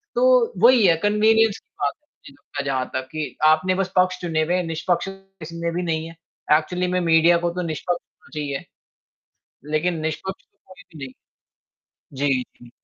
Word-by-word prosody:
तो - - +4
वही 245 -4 +6
है 165 - +5
कंविनियंस 220 +1 +3
की - - -53
बात 140 -1 +1
है, 300 - -45 0.2
जिनका 150 - -8
जहाँ 130 -2 -1
तक 130 0 -3
कि 155 -1 -5
आपने 160 +4 +4
बस 190 -1 -2
पक्ष 185 0 +3
चुने 160 -2 0
हुए 175 +3 0
हैं, 180 - 0
निष्पक्ष 170 +4 -1 0.3
इसमें 170 +1 -4
भी 180 - -1
नहीं 160 -1 -2
है, 165 - -12 0.4
एक्चुअली 180 +3 -2
में 180 0 0
मीडिया 165 +1 +5
को - - +2
तो 180 - -3
निष्पक्ष 175 +3 -3
होना - - -25
चाहिए, 145 -2 -4 1.1
लेकिन 165 +2 0
निष्पक्ष 160 +5 -4
तो - - -45
कोई 185 -1 -15
भी 155 -6 -10
नहीं। 130 - -11 1.0
जी, 135 -2 +1 0.2
जी। 120 - -14
170 Hz, 180 wpm, -22 LUFS, 155-185 Hz, 1.1 s, वही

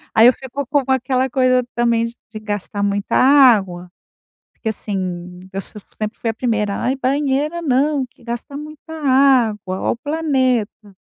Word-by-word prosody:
Aí 225 +1 +8
eu 250 - +6
fico 270 +2 -6
com 285 0 +1
aquela 260 0 +1
coisa 255 0 +2
também 235 -1 +2
de 230 -1 -11
gastar 205 -1 -4
muita 200 0 -1
água. 220 -10 +4 0.6
Porque 225 - -4
assim, 180 -4 -4
eu - - -5
s 195 - -7
eu 210 - -9 0.2
sempre 215 +1 -4
fui 230 - -1
a - - -1
primeira: 215 -5 -1
"Ai, 260 - 0
banheira 285 +4 0
não, 280 -1 +1
que 245 - -25
gasta 240 +4 -6
muita 305 +2 -10
água, 255 -9 +2
ó - - +1
o - - -3
planeta". 255 -8 -1
245 Hz, 160 wpm, -19 LUFS, 210-275 Hz, 0.6 s, Aí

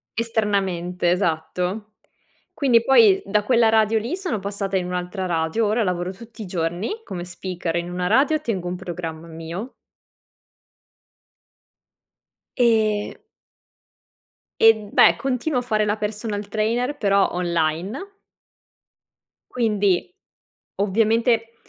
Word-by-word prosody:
Esternamente 195 -6 0
esatto. 180 +4 -2 0.6
Quindi 245 -5 +3
poi 230 -7 +5
da 210 +1 +1
quella 235 -1 +4
radio 220 0 +3
lì 240 +11 -3
sono 370 - -3
passata 200 0 -3
in 180 -1 -1
un'altra 180 +1 -3
radio. 165 +5 0
Ora 215 +3 +1
lavoro 180 -1 -1
tutti 225 +2 -11
i - - -6
giorni 175 - -3
come 175 -2 -6
speaker 175 -1 -4
in 170 +1 -2
una 180 0 -2
radio 275 +9 +3
tengo 195 - -3
un 180 - -3
programma 170 -3 -6
mio. 165 +9 -7 2.8
E 220 -4 +1 1.4
E 225 0 +9
beh 205 -5 +4
continuo 260 - -1
a - - -6
fare 215 -3 0
la 210 - 0
personal 210 -1 -4
trainer 230 +6 -1
però 200 -1 +3
online. 170 - -1 1.5
Quindi 210 -6 +1 0.7
ovviamente 225 +3 +1
205 Hz, 110 wpm, -22 LUFS, 180-225 Hz, 2.8 s, E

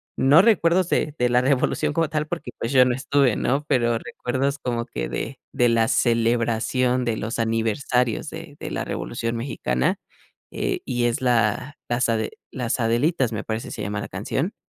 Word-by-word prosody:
no 145 +6 +6
recuerdos 185 -4 +3
de 150 - 0
de 125 - +3
la 125 0 +3
Revolución 140 +3 +1
como 165 +2 +1
tal, 155 -1 -1
porque, 165 -7 -5
pues, 115 - -2
yo 130 -2 +6
no 125 - +1
estuve, 135 -2 +2
¿no? 140 +3 0
Pero 120 -2 +2
recuerdos 135 +5 -2
como 120 -2 -2
que - - -4
de - - -4
de 120 - +3
la 115 -1 +2
celebración 120 +2 +1
de 115 -2 -1
los 110 +2 -3
aniversarios 115 +3 0
de 160 -2 -9
de - - -5
la - - -3
Revolución 115 0 -3
Mexicana, 65 - -1 0.5
eh, - - -2
y 120 -1 -1
es 120 -1 +1
la 125 +3 +1
las 120 +1 +1
ade 110 -2 0 0.2
Las 125 0 -2
Adelitas 120 +2 +1
me 105 - -3
parece 110 0 -4
se - - -6
llama 105 +1 -3
la - - -5
canción. 135 - -3
120 Hz, 180 wpm, -23 LUFS, 115-140 Hz, 0.5 s, no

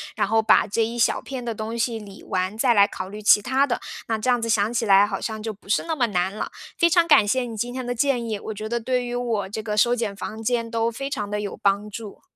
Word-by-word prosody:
然 - - +1
后 225 0 +2
把 220 0 +4
这 220 +2 0
一 235 +2 -5
小 235 - +2
片 260 -2 -6
的 235 -1 -3
东 220 +2 -5
西 230 0 -1
理 200 -2 -12
完， 185 +2 -2
再 240 +1 +3
来 200 -2 +6
考 185 -2 -6
虑 210 +2 -8
其 210 0 +6
他 265 +5 +1
的。 240 - -2 0.3
那 225 - 0
这 220 +4 -2
样 245 -1 +3
子 230 - -2
想 220 0 +1
起 235 -1 0
来， 200 -1 +6
好 - - -4
像 220 -1 -5
就 220 - -2
不 205 -1 -17
是 200 - +1
那 325 -1 -3
么 250 - +3
难 185 -2 -1
了。 215 - -4 0.3
非 340 - +4
常 340 0 +4
感 295 -10 +5
谢 255 +5 +2
你 235 -3 -5
今 245 +3 -3
天 255 -1 -4
的 245 - -2
建 245 -1 0
议， 215 -2 -2
我 220 - -6
觉 215 +1 -6
得 235 +1 -1
对 250 +2 -1
于 240 - -5
我 230 -5 -2
这 215 +2 -4
个 210 -1 -3
收 235 +3 +4
减 225 -4 -2
房 215 +2 -6
间 230 0 -1
都 230 0 +1
非 275 +4 -5
常 210 -7 -3
地 210 0 -2
有 205 - -5
帮 200 +1 +1
助。 210 -1 -9
225 Hz, 310 characters per minute, -23 LUFS, 210-245 Hz, 0.3 s, 来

